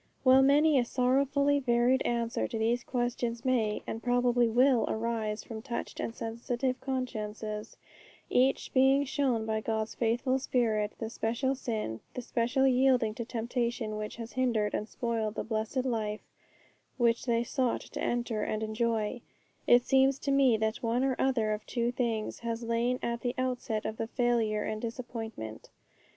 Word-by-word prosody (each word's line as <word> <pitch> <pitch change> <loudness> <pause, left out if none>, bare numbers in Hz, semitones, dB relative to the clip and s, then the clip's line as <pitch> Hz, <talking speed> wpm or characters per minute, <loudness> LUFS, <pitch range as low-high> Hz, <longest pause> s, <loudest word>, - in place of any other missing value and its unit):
While 260 0 +7
many 285 +1 +5
a - - +3
sorrowfully 275 +3 +2
varied 250 0 +2
answer 235 -1 0
to 225 - -4
these 235 +2 +1
questions 240 -1 -2
may, 225 -5 +1
and 225 - -5
probably 245 0 +3
will, 250 +1 +4
arise 220 -1 -2
from 225 -2 -7
touched 235 0 -5
and 230 - -3
sensitive 240 +3 -2
consciences, 215 -4 -4 0.5
each 260 +2 +1
being 270 +2 +5
shown 255 -5 0
by 220 0 -1
God's 220 0 -2
faithful 245 +3 +1
Spirit 220 -5 0
the 225 -1 -5
special 235 +5 0
sin, 220 - -3 0.2
the 250 - -4
special 240 +3 +1
yielding 255 -4 +3
to 235 - -4
temptation 235 -1 -2
which 215 0 -5
has 230 0 -8
hindered 235 -5 +1
and 215 - -2
spoiled 225 -3 -2
the - - -2
blessed 225 +3 -2
life 215 -4 -2 0.8
which 235 +1 +2
they 235 0 +2
sought 255 0 0
to - - -7
enter 240 -2 -1
and 215 +1 -2
enjoy, 225 +1 -1 0.5
it 240 0 +6
seems 270 0 +4
to 280 - -2
me 270 -4 +4
that 220 0 0
one 235 +2 +1
or 265 -1 +1
other 240 -5 +1
of 210 - -5
two 235 -1 0
things 230 -3 -2
has 230 0 -3
lain 235 +2 0
at 235 0 -2
the 245 -1 -2
outset 250 -4 -2
of 220 - -3
the 225 - -2
failure 230 -4 +1
and 215 0 -3
disappointment. 225 - -6
235 Hz, 160 wpm, -30 LUFS, 220-255 Hz, 0.8 s, While